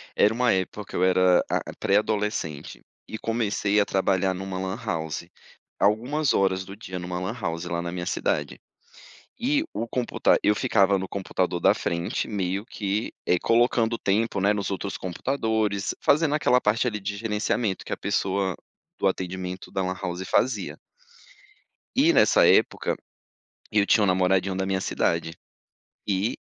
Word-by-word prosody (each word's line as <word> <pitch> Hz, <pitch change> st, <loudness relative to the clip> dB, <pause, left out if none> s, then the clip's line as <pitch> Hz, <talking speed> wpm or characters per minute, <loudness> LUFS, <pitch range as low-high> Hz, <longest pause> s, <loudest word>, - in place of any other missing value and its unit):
Era 105 Hz, -, +4 dB
uma 125 Hz, +1 st, +2 dB
época 95 Hz, +2 st, -1 dB
que -, -, -8 dB
eu 90 Hz, -, +1 dB
era, 90 Hz, -1 st, +4 dB
a -, -, +1 dB, 0.2 s
pré-adolescente, 105 Hz, -7 st, -1 dB, 0.3 s
e 110 Hz, -, -5 dB
comecei 105 Hz, -2 st, 0 dB
a 100 Hz, -, +3 dB
trabalhar 95 Hz, -1 st, +1 dB
em -, -, -7 dB
uma 95 Hz, -1 st, -5 dB
lan 95 Hz, 0 st, -3 dB
house, 80 Hz, -5 st, -3 dB, 0.5 s
algumas 125 Hz, +8 st, +2 dB
horas 95 Hz, -1 st, +1 dB
do 100 Hz, +1 st, -10 dB
dia 95 Hz, -4 st, -8 dB
em 90 Hz, -, -7 dB
uma 90 Hz, 0 st, -3 dB
lan 95 Hz, +3 st, -3 dB
house, 85 Hz, -6 st, -3 dB
lá 85 Hz, -1 st, -2 dB
na 85 Hz, 0 st, -4 dB
minha 90 Hz, 0 st, -4 dB
cidade. -, -, -1 dB, 0.8 s
E 285 Hz, +5 st, +1 dB
o 115 Hz, -, -3 dB
computa 125 Hz, +1 st, +1 dB
eu 105 Hz, -, +4 dB
ficava 100 Hz, -1 st, +3 dB
no 95 Hz, -, -4 dB
computador 95 Hz, -2 st, -2 dB
da -, -, +5 dB
frente 85 Hz, +1 st, -2 dB
meio 100 Hz, -1 st, -2 dB
que, 105 Hz, -1 st, -3 dB
eh, 90 Hz, -, +2 dB
colocando 115 Hz, 0 st, +2 dB
tempo, 105 Hz, +1 st, 0 dB
né, 100 Hz, +2 st, +3 dB
nos 100 Hz, -1 st, -2 dB
outros 95 Hz, 0 st, -4 dB
computadores, 110 Hz, +1 st, -1 dB
fazendo 150 Hz, 0 st, +3 dB
aquela 135 Hz, -4 st, +3 dB
parte 105 Hz, +4 st, +1 dB
ali 110 Hz, -4 st, -1 dB
de 100 Hz, +1 st, -4 dB
gerenciamento, 105 Hz, -1 st, -1 dB
que -, -, -3 dB
a -, -, -4 dB
pessoa 95 Hz, -1 st, -1 dB, 0.4 s
do -, -, +2 dB
atendimento 95 Hz, 0 st, -4 dB
da 95 Hz, -, -1 dB
lan 95 Hz, 0 st, -2 dB
house, 90 Hz, +1 st, -4 dB
fazia. 130 Hz, -, 0 dB, 1.2 s
E, 300 Hz, +6 st, +5 dB
nessa -, -, +5 dB
época, -, -, +3 dB, 0.8 s
eu 105 Hz, -2 st, +3 dB
tinha 105 Hz, -, +4 dB
um -, -, +3 dB
namoradinho 95 Hz, +1 st, +2 dB
da 95 Hz, 0 st, -1 dB
minha 95 Hz, 0 st, 0 dB
cidade, 85 Hz, -3 st, -1 dB, 0.7 s
e 100 Hz, +2 st, 0 dB
100 Hz, 165 wpm, -25 LUFS, 95-110 Hz, 1.2 s, da